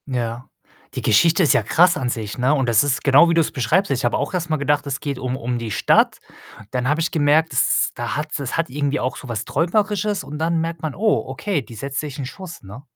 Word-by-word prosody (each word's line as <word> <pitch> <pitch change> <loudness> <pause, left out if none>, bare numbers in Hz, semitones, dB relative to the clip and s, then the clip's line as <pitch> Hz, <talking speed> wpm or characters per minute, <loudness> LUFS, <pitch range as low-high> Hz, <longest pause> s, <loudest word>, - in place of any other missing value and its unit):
Ja. 120 -1 -3 0.5
Die - - -3
Geschichte 160 - +4
ist 150 - +4
ja 115 - +2
krass 175 - +4
an 130 -5 -2
sich, 110 -4 -4
ne, 130 +3 +2
und 135 -4 0
das 115 0 +4
ist 145 -2 -1
genau, 145 +5 +6
wie - - +2
du's 165 -2 +2
beschreibst. 155 - +1
Ich 130 - -1
habe 120 - +1
auch 145 - -3
erst 170 -2 -2
mal 155 - +1
gedacht, 145 0 0
es 140 0 -3
geht 140 -3 -4
um 130 0 -3
um 120 0 -3
die 115 -2 -5
Stadt, - - +3 0.5
dann 125 0 -1
habe 150 +2 +1
ich 165 - -1
gemerkt, 155 -1 +2
es 125 - +3
ist - - +1
da 120 0 -4
hat 155 +1 -3
es 140 0 -4
hat 165 0 -1
irgendwie 145 +2 -1
auch 130 - -2
so 130 - -10
was 110 -1 -3
Träumerisches 205 +4 0
und 145 +2 -7
dann 165 +1 0
merkt 165 +1 -3
man: 155 -3 -3
„Oh, 215 +1 +1
okay, 200 -8 -2
die 115 -2 -13
setzt 135 +5 -4
sich 145 -3 -7
'n 135 - -3
Schuss”, 180 +5 -9
ne? 100 +7 -10
145 Hz, 255 wpm, -21 LUFS, 125-165 Hz, 0.5 s, genau